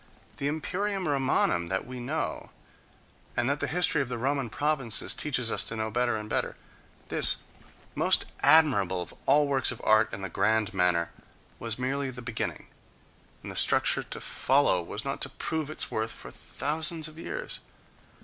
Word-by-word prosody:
The 140 - -2
imperium 185 +5 -2
Romanum 135 - +1
that 95 +2 -2
we 125 0 -8
know, 120 - -4 0.9
and 120 - +1
that 140 +1 0
the - - -1
history 165 -3 +1
of 135 - -4
the 125 - -3
Roman 135 0 -1
provinces 135 -3 +1
teaches 125 -6 +1
us - - +1
to 115 - -5
know 110 0 -3
better 120 0 0
and 105 0 -7
better,—this - - +1 0.5
most - - +3
admirable 125 - +4
of - - -13
all 145 +2 +4
works 135 -2 +2
of 125 - -8
art 110 0 +3
in 95 0 -6
the - - -2
grand 110 +4 0
manner 90 -2 +1 0.5
was 115 -1 -2
merely 135 +2 -2
the 125 -1 -9
beginning, 120 -2 -4 0.8
and - - -7
the - - -9
structure - - +3
to - - -7
follow 135 -9 +2
was 105 +8 -6
not 135 - -4
to 135 - -1
prove 155 +2 -3
its 155 - 0
worth 110 +1 -2
for - - -11
thousands 155 +1 0
of 155 +1 -12
years. - - -5
130 Hz, 170 wpm, -27 LUFS, 110-150 Hz, 0.9 s, admirable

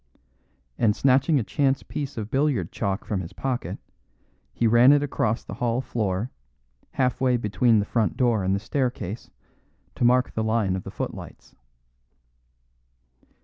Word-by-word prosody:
And 105 -3 +3
snatching 135 +3 +3
a - - -1
chance 135 +3 0
piece 140 -4 -5
of 110 0 -5
billiard 135 - +1
chalk 100 -2 -2
from 100 -3 -2
his 90 +2 -8
pocket, 130 +3 -3 0.7
he 120 - -1
ran 120 +4 +6
it 145 0 +3
across 115 -5 -1
the - - -8
hall 120 0 -1
floor, 110 -4 -2 0.6
half 130 -1 0
way 125 -2 +3
between 115 +1 +2
the 105 - +1
front 110 -1 0
door 120 -5 +2
and 95 +1 +1
the - - -1
staircase, 120 -3 -3 0.6
to - - -3
mark 125 +1 +4
the 110 - -2
line 110 -4 +1
of 95 - -5
the - - -6
footlights. - - -7
120 Hz, 150 wpm, -25 LUFS, 105-130 Hz, 0.7 s, ran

